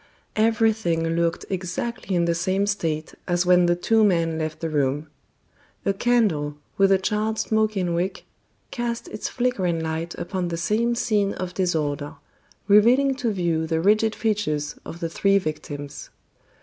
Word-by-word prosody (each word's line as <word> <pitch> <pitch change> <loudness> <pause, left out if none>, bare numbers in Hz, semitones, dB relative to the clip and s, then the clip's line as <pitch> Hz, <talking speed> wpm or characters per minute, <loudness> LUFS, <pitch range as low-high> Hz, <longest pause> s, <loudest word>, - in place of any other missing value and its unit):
Everything 220 -7 +2
looked 170 0 0
exactly 190 +2 -3
in 170 -1 +2
the 170 - +2
same 185 +3 0
state 165 -6 -2
as 175 0 +1
when 180 -1 +5
the 175 - +3
two 220 +5 +2
men 165 -5 +2
left 155 0 -3
the 165 - -2
room. 145 0 0 0.8
A 195 - +2
candle, 195 -11 +1 0.2
with 195 0 +4
a 195 - +6
charred 215 +3 -1
smoking 215 -6 0
wick, 175 +3 -2 0.5
cast 235 -1 -3
its - - -4
flickering 190 -9 0
light 160 +1 -3
upon 185 -1 -3
the 170 -1 -3
same 225 +7 +1
scene 210 -4 +1
of 180 -1 -5
disorder, 150 -6 -1 0.5
revealing 240 +7 +5
to 245 -3 0
view 170 -4 0
the 160 0 0
rigid 215 +5 +3
features 155 -10 -1
of 170 - -8
the 165 - 0
three 195 +4 +3
victims. 150 -4 -5
180 Hz, 150 wpm, -24 LUFS, 165-215 Hz, 0.8 s, a